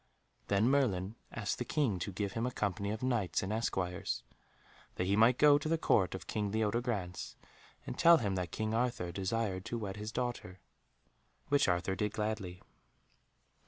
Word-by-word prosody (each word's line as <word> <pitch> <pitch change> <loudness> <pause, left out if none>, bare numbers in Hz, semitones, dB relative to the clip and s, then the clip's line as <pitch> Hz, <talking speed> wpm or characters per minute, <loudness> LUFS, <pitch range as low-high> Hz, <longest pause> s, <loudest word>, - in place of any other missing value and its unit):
Then 100 +3 +3
Merlin 110 -8 +2 0.2
asked 105 -2 -3
the - - 0
King 125 - 0
to 100 - -3
give 100 +1 -2
him 115 +3 -1
a - - -2
company 100 -2 -2
of 110 +3 -4
knights 115 -10 0
and 95 +3 -2
esquires, 95 -4 -2 0.7
that 90 - -1
he 100 +2 +2
might 115 +4 +5
go 145 -1 +6
to 155 - -3
the 165 - +2
Court 95 - +2
of 95 - -7
King 105 -2 -2
Leodegrance 110 -4 -1 0.5
and - - -6
tell 170 0 +8
him 105 -8 -1
that 90 -2 -2
King 110 0 -2
Arthur 120 -6 0
desired 95 0 -2
to 120 - -3
wed 100 -3 -5
his 105 +1 -5
daughter, 120 -7 -4 0.9
which 145 0 +4
Arthur 90 +1 +1
did 105 +2 -1
gladly. 105 -4 -3
105 Hz, 170 wpm, -33 LUFS, 95-120 Hz, 0.9 s, tell